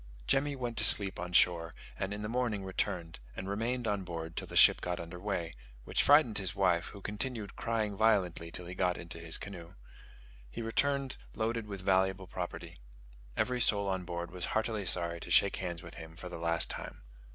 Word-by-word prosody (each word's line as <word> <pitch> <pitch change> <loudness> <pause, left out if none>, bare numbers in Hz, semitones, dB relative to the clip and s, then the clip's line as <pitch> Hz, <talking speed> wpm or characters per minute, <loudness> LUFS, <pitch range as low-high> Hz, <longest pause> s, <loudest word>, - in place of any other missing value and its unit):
Jemmy 140 - +2
went 120 -3 -4
to - - +4
sleep 100 -4 +5
on 90 0 -4
shore, 85 -1 +3 0.2
and 95 - -3
in 105 +1 -4
the - - -2
morning 115 -4 -1
returned, 90 -3 -2 0.2
and 95 - -5
remained 115 +5 -1
on 100 -2 0
board 80 -2 -6
till - - -3
the - - -9
ship - - +7
got 90 0 -2
under 85 +1 -7
way, 90 -4 -2 0.3
which - - +1
frightened 145 -8 +5
his 95 -1 -2
wife, 90 -3 +2
who 100 - -10
continued 105 +1 -4
crying 110 -3 -1
violently 95 -6 +2
till 90 +1 -6
he 90 - -6
got 90 -1 +1
into 85 -1 -7
his 80 -1 +1
canoe. 85 -4 -9 0.7
He 65 - -6
returned 140 +4 0 0.2
loaded 115 0 -1
with 100 -2 -6
valuable 95 0 +2
property. - - -6 0.6
Every 125 -1 +1
soul 100 -3 +3
on 95 -1 -1
board 85 0 -5
was 90 -1 -2
heartily 110 -3 -1
sorry 85 -1 -1
to - - -9
shake 100 - +4
hands 85 -3 -4
with 85 - -10
him 80 0 -10
for 90 +1 -8
the 90 - -7
last 85 0 +2
time. - - -7
95 Hz, 195 wpm, -32 LUFS, 85-110 Hz, 0.7 s, ship